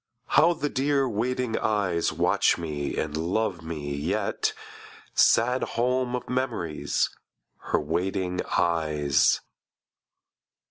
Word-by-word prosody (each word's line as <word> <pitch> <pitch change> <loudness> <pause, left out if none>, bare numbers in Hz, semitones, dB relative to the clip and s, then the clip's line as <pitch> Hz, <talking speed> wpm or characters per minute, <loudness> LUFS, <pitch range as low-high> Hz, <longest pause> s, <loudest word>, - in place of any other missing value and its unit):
How 170 +3 +5
the 150 -3 -2
dear 140 0 +1
waiting 125 +1 -1
eyes 100 -6 +1
Watch 90 +5 +2
me 75 -4 -4
and 75 -1 -2
love 90 +3 -1
me 75 -3 -5
yet: 70 - -1 0.6
Sad 125 +3 +4 0.2
home 125 +1 +1
of 125 - -5
memories, 110 - -1 0.6
Her - - +2
waiting 90 +3 -1 0.2
eyes! 75 -4 +2
95 Hz, 100 wpm, -26 LUFS, 80-125 Hz, 0.6 s, How